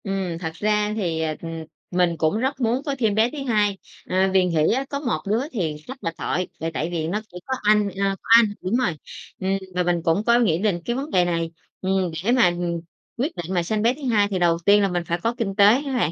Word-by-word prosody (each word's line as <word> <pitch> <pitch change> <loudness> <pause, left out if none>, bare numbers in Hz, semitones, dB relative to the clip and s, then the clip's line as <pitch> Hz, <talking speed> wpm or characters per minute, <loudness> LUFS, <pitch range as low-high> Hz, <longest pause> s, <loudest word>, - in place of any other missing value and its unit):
Ừm. 195 -4 -2
Thật 160 -2 -4
ra 210 +3 0
thì, 170 -7 -1
ờ, 155 -1 -1
ừm, 165 -1 -6 0.3
mình 175 -2 +2
cũng 160 +6 +1
rất 265 +2 -2
muốn 240 +2 +1
có 280 -2 -1
thêm 220 -4 +1
bé 220 +2 +3
thứ - - -8
hai, 210 -4 +2 0.3
ờ, 190 +1 +2
vì 190 -1 +4
nghĩ 165 -1 +2
á 265 +3 -1
có 280 - -3
một 240 - -2
đứa 220 +3 +2
thì 165 -9 -2
rất 260 - -7
là 165 - -1
tội, 180 0 -1
là 165 - -2
tại 160 +2 -2
vì 160 -2 -2
nó 205 +6 -2
chỉ 180 - -9
có 265 - -2
anh, 210 -1 +3
ờ, 195 0 -1
có - - -14
anh. 235 0 +8 0.2
Đúng 185 +5 -1
rồi. 250 -6 +2 0.5
Ừm, 190 +1 0 0.2
và 180 - +2
mình 175 -1 0
cũng 170 +4 +1
có 235 0 +5
nghĩ 175 -9 +2
đến 195 -4 0
cái 240 - -1
vấn 275 +4 -4
đề 180 -1 +3
này, 165 -1 -1 0.3
ừm, 190 -2 0
để 230 - +2
mà, 250 -5 +5
ừm, 175 -1 -3 0.4
quyết 275 +8 -2
định 175 +2 -5
mà 175 -2 +1
sanh 210 +5 -1
bé 235 +3 +3
thứ 295 - -13
hai 205 -3 +3
thì 195 -2 -2
đầu 170 -1 +3
tiên 205 +1 +6
là 200 - +3
mình 175 -2 -2
phải 170 +1 -1
có 230 - +1
kinh 200 -6 -2
tế 200 -1 +6 0.2
á 275 - -3
bạn. 165 -10 +1
195 Hz, 265 wpm, -23 LUFS, 175-225 Hz, 0.5 s, anh